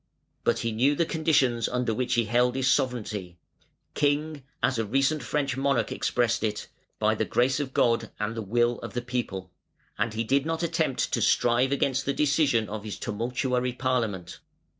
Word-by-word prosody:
But -, -, +2 dB
he 115 Hz, -, 0 dB
knew 130 Hz, +7 st, +2 dB
the 170 Hz, -, +1 dB
conditions 145 Hz, -8 st, +2 dB
under 125 Hz, -2 st, 0 dB
which 125 Hz, +2 st, 0 dB
he 120 Hz, -1 st, +2 dB
held 125 Hz, +3 st, +2 dB
his 130 Hz, -1 st, 0 dB
sovereignty 110 Hz, -10 st, -1 dB, 0.6 s
"king", 150 Hz, +1 st, 0 dB, 0.2 s
as 130 Hz, -, +2 dB
a -, -, +1 dB
recent 135 Hz, +7 st, +1 dB
French 140 Hz, +2 st, -1 dB
monarch 140 Hz, +1 st, +1 dB
expressed 120 Hz, -2 st, 0 dB
it, 105 Hz, -1 st, -2 dB, 0.3 s
"by -, -, +2 dB
the -, -, -1 dB
grace 130 Hz, +3 st, +1 dB
of 140 Hz, -3 st, -3 dB
God 115 Hz, -3 st, +2 dB
and 105 Hz, +1 st, -1 dB
the 115 Hz, -, -4 dB
will 120 Hz, +3 st, +1 dB
of -, -, -8 dB
the 120 Hz, -, -2 dB
people", 110 Hz, -7 st, -4 dB, 0.5 s
and 115 Hz, -2 st, -1 dB
he 115 Hz, -, 0 dB
did 135 Hz, +4 st, +2 dB
not 165 Hz, +2 st, -2 dB
attempt 160 Hz, -5 st, 0 dB
to 115 Hz, -, +1 dB
strive 120 Hz, +4 st, +3 dB
against 135 Hz, -2 st, 0 dB
the 140 Hz, -, +2 dB
decision 140 Hz, -6 st, +2 dB
of 105 Hz, 0 st, -6 dB
his 105 Hz, -2 st, -6 dB
tumultuary 125 Hz, +3 st, -1 dB
parliament. 115 Hz, -8 st, -2 dB
125 Hz, 180 wpm, -27 LUFS, 115-140 Hz, 0.6 s, strive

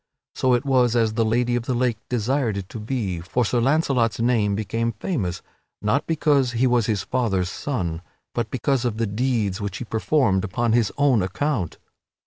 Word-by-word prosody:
So 130 Hz, -1 st, +2 dB
it 120 Hz, +3 st, -2 dB
was 125 Hz, -3 st, +3 dB
as 115 Hz, -2 st, +2 dB
the 115 Hz, +1 st, +1 dB
Lady 120 Hz, +2 st, +1 dB
of 120 Hz, -1 st, -3 dB
the 130 Hz, -, 0 dB
Lake 120 Hz, -2 st, 0 dB
desired 125 Hz, -1 st, 0 dB
it 95 Hz, -2 st, -6 dB
to 115 Hz, -, -7 dB
be, 105 Hz, -6 st, -2 dB
for 115 Hz, +8 st, 0 dB
Sir 120 Hz, +3 st, +1 dB
Launcelot's 130 Hz, -4 st, +2 dB
name 115 Hz, -4 st, +2 dB
became 115 Hz, +3 st, -1 dB
famous, 105 Hz, -, -3 dB, 0.4 s
not 105 Hz, +8 st, 0 dB
because 145 Hz, -5 st, +2 dB
he 120 Hz, +2 st, +2 dB
was 120 Hz, -3 st, +2 dB
his 105 Hz, -4 st, 0 dB
father's 100 Hz, -8 st, 0 dB
son, 90 Hz, -, -3 dB, 0.3 s
but 115 Hz, -2 st, -2 dB
because 130 Hz, +1 st, 0 dB
of 120 Hz, -3 st, -1 dB
the 115 Hz, -, +1 dB
deeds 110 Hz, -2 st, -1 dB
which 100 Hz, -2 st, -3 dB
he 125 Hz, -, -6 dB
performed 110 Hz, -4 st, +1 dB
upon 115 Hz, +4 st, 0 dB
his 115 Hz, -2 st, +2 dB
own 140 Hz, -6 st, +4 dB
account. 95 Hz, -, -2 dB
115 Hz, 185 wpm, -23 LUFS, 105-130 Hz, 0.4 s, own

